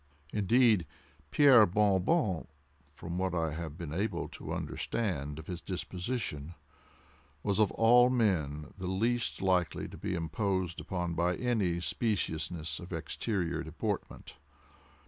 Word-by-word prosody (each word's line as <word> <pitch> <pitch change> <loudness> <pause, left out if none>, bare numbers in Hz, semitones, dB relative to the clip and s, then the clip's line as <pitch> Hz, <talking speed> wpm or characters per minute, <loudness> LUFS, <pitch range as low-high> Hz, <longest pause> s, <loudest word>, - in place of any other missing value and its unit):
Indeed, 105 - +4 0.4
Pierre 130 -7 +7
Bon 100 0 +3
Bon, 100 - +1 0.5
from 85 +4 -5
what 95 -2 0
I 80 -2 0
have 80 -1 -6
been 85 -5 -6
able 100 +6 -1
to - - -8
understand 80 -11 -2
of 80 - -8
his 90 0 -6
disposition, 90 - -4 0.9
was 100 0 0
of 105 -3 +4
all 120 +2 +6
men 80 - 0
the 95 - -4
least 115 +4 0
likely 90 -3 +1
to - - -10
be - - -2
imposed 90 +2 -1
upon 90 -2 -3
by 85 +2 +1
any 105 -9 0
speciousness 80 -6 -2
of 90 - -10
exterior 85 +1 -2
deportment. 90 +6 -4
90 Hz, 125 wpm, -31 LUFS, 85-110 Hz, 0.9 s, Pierre